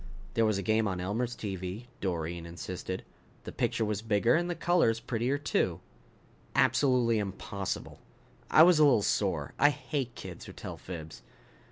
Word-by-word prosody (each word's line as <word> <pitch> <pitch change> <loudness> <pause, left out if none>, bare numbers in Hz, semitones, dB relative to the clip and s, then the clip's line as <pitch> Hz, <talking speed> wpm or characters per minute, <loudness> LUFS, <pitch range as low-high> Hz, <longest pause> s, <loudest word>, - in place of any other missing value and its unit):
"There 115 -1 +3
was 105 -2 +1
a 100 - -3
game 110 +2 +2
on 95 -2 -2
Elmer's 115 +7 -2
TV," 95 +2 -5
Doreen 85 -2 -3
insisted. 90 +2 -5 0.4
"The - - -7
picture 110 - 0
was 105 -1 -2
bigger 115 +1 +2
and 175 +2 +1
the 175 - -1
colors 165 -10 +2
prettier, 120 +5 -1
too." 95 - 0 0.8
"Absolutely 125 -5 +3
impossible." 100 0 -4 0.5
I 155 - +8
was 175 -2 +6
a - - +7
little 135 -8 +5
sore. 90 -10 0
I 145 - +7
hate 135 -4 -3
kids - - -8
who - - -10
tell - - -7
fibs. 80 -4 -8
110 Hz, 160 wpm, -30 LUFS, 95-125 Hz, 0.8 s, I